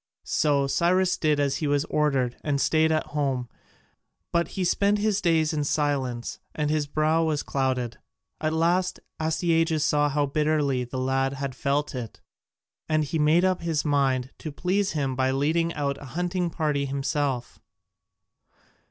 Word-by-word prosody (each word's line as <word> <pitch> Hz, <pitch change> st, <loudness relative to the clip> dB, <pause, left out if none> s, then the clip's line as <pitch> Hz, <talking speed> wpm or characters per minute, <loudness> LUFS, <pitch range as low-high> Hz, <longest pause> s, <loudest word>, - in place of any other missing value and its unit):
So 145 Hz, -2 st, +2 dB
Cyrus 180 Hz, +5 st, +2 dB
did 150 Hz, -4 st, +1 dB
as 140 Hz, -1 st, +1 dB
he 155 Hz, -, -2 dB
was 145 Hz, +1 st, +1 dB
ordered 135 Hz, -6 st, +1 dB
and 145 Hz, -2 st, 0 dB
stayed 160 Hz, +2 st, +3 dB
at 155 Hz, 0 st, +1 dB
home, 135 Hz, -4 st, -1 dB, 0.8 s
but 170 Hz, 0 st, +1 dB
he 190 Hz, -, +1 dB
spent 200 Hz, +3 st, +2 dB
his 205 Hz, -1 st, +1 dB
days 160 Hz, -3 st, +2 dB
in 150 Hz, -1 st, 0 dB
silence 140 Hz, -5 st, -1 dB, 0.2 s
and 150 Hz, -1 st, 0 dB
his 155 Hz, -1 st, 0 dB
brow 155 Hz, +2 st, +2 dB
was 155 Hz, -2 st, 0 dB
clouded. 130 Hz, -4 st, -1 dB, 0.4 s
At 155 Hz, 0 st, 0 dB
last 170 Hz, +3 st, +1 dB, 0.2 s
Astyages 160 Hz, -1 st, +1 dB
saw 145 Hz, -1 st, +2 dB
how 145 Hz, 0 st, +1 dB
bitterly 145 Hz, -3 st, +1 dB
the 125 Hz, +2 st, -6 dB
lad 135 Hz, +1 st, 0 dB, 0.2 s
felt 140 Hz, +3 st, -1 dB
it, 125 Hz, -4 st, -6 dB, 0.7 s
and 155 Hz, 0 st, +2 dB
he 155 Hz, +2 st, -2 dB
made 155 Hz, +4 st, +4 dB
up 185 Hz, -1 st, +1 dB
his 165 Hz, -3 st, -1 dB
mind 135 Hz, -3 st, +1 dB
to 155 Hz, -, -6 dB
please 190 Hz, +6 st, 0 dB
him 135 Hz, -4 st, -1 dB
by 130 Hz, 0 st, +1 dB
leading 160 Hz, +5 st, +1 dB
out 140 Hz, -2 st, -2 dB
a -, -, -8 dB
hunting 180 Hz, 0 st, 0 dB
party 150 Hz, -4 st, -1 dB
himself. 135 Hz, -2 st, -2 dB
150 Hz, 155 wpm, -26 LUFS, 140-165 Hz, 0.8 s, made